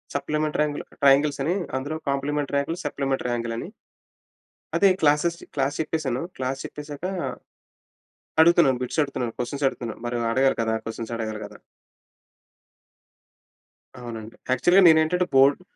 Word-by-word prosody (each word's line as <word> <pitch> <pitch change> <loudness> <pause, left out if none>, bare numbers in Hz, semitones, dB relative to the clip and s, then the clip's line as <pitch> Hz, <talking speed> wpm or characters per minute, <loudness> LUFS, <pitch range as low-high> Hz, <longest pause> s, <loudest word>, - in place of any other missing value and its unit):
Supplementary 150 +1 0
ట్ర - - -5 0.2
triangles 140 +1 +4
అని 170 - +1 0.2
అందులో 145 +4 -4
complementary 140 +1 -1
angle, 165 +4 -3
supplementary 135 -3 -1
angle 115 -1 -2
అని - - -5 1.1
అయితే, 200 - +5
క్లాసెస్ 150 +3 +3 0.2
క్లాస్ 140 0 0
చెప్పేసాను. 150 -5 -1
క్లాస్ 130 +1 -3
చెప్పేసాక 150 +1 -8 1.4
అడుగుతున్నాను. 160 -6 +5
బిట్స్ 125 +5 -1
అడుగుతున్నాను. 130 -5 -3
క్వెషన్స్ 135 +3 -1
అడుగుతున్నాను. 120 -4 -7
మరి 120 0 -2
అడగాలి 135 +2 +3
కదా! 110 0 0
క్వెషన్స్ 115 +1 -6
అడగాలి 110 -2 -4
కదా! - - -14 2.4
అవునండి. 115 -2 -8 0.2
యాక్చువల్‌గా 175 +9 +5
నేనేంటంటే, 160 +3 +4
బోర్డ్ 140 +4 +5
140 Hz, 120 wpm, -24 LUFS, 125-150 Hz, 2.4 s, అయితే